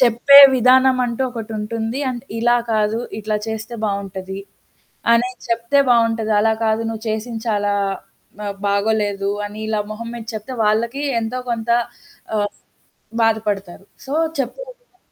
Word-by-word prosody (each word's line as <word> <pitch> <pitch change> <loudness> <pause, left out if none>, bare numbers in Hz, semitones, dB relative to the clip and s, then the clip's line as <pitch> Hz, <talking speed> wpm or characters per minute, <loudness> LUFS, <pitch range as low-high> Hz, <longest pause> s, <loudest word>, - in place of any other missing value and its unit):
చెప్పే 255 +3 +7 0.2
విధానం 255 +1 +5
అంటూ 240 +2 -2
ఒకటుంటుంది. 225 +1 -4
అండ్ 245 -1 -4 0.2
ఇలా 240 +1 +3 0.2
కాదు 215 +1 +1 0.2
ఇట్లా 215 0 -1
చేస్తే 220 +1 -5
బావుంటది 195 -2 -4 0.7
అనేది 245 +2 +1
చెప్తే 235 +4 +1
బావుంటది. 230 -2 +2
అలా 220 +1 +3
కాదు 220 0 +1
నువ్వు 225 0 -6
చేసింది 220 +1 -4
చాలా 205 -1 0 0.7
ఆహ్, 200 -1 -3
బాగోలేదు 200 -1 0 0.2
అని 205 +1 -7
ఇలా 215 -1 -1
మొహం 230 +2 -6
మీద 235 -2 -7
చెప్తే 220 +5 -6
వాళ్ళకి 235 +6 0 0.2
ఎంతో 230 +3 -3
కొంత 230 0 -2 0.7
ఆహ్ 205 0 0 0.7
బాధపడతారు. 205 -4 -1 0.2
సో, 270 - -8 0.3
చెప్పే 270 - -3 0.2
విధా - - -37
225 Hz, 130 wpm, -20 LUFS, 210-240 Hz, 0.7 s, చెప్పే